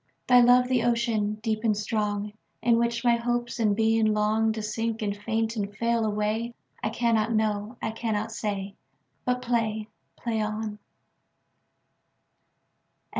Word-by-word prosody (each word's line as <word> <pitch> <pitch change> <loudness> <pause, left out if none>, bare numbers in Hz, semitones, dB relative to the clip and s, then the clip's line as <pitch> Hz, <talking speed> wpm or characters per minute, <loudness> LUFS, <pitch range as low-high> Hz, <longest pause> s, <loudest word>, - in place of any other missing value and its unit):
Thy 250 -1 +7
love 250 +1 +6
the 255 -2 +2
ocean, 230 -3 +1
deep 220 -1 -1
and 215 -3 +2
strong, 210 -1 -2 0.3
In 235 -1 +4
which 235 0 0
my 240 -1 +4
hopes 240 0 -2
and 210 -3 +3
being 225 0 +3
longTo 215 +1 +1
sink 225 +1 -2
and 200 -1 -1
faint 225 +2 -1
and 200 -2 -4
fail 235 0 +1
away?I 215 +3 -3
cannot 230 -1 +1
know. 215 +1 -1
I - - 0
cannot 220 -1 -2
say. 200 -3 -3 0.5
But 250 0 0
play, 220 -3 -1 0.3
play 225 -2 -2
on. 215 0 -3
220 Hz, 130 wpm, -27 LUFS, 210-235 Hz, 0.5 s, Thy